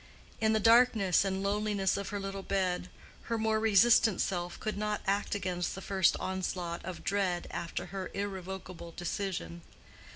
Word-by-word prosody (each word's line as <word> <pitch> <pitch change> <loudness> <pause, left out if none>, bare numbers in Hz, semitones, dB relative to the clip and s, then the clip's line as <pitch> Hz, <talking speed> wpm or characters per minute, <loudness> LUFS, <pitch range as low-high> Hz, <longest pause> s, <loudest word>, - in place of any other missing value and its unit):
In 220 0 +3
the 220 - +3
darkness 225 -5 +5
and 195 0 -2
loneliness 205 -1 +1
of 200 -1 -3
her 205 - -3
little 195 0 -4
bed, 185 -2 -1 0.4
her 230 - +1
more 220 0 +1
resistant 220 -1 +5
self 175 -2 -2
could 215 - -3
not 210 0 -2
act 200 +1 0
against 180 -3 -2
the - - -6
first 190 -2 +2
onslaught 180 -2 -3
of 180 -1 -7
dread 190 -3 0
after 170 - -4
her 190 -2 -4
irrevocable 190 -3 -6
decision. 175 -1 -3
195 Hz, 155 wpm, -31 LUFS, 180-210 Hz, 0.4 s, darkness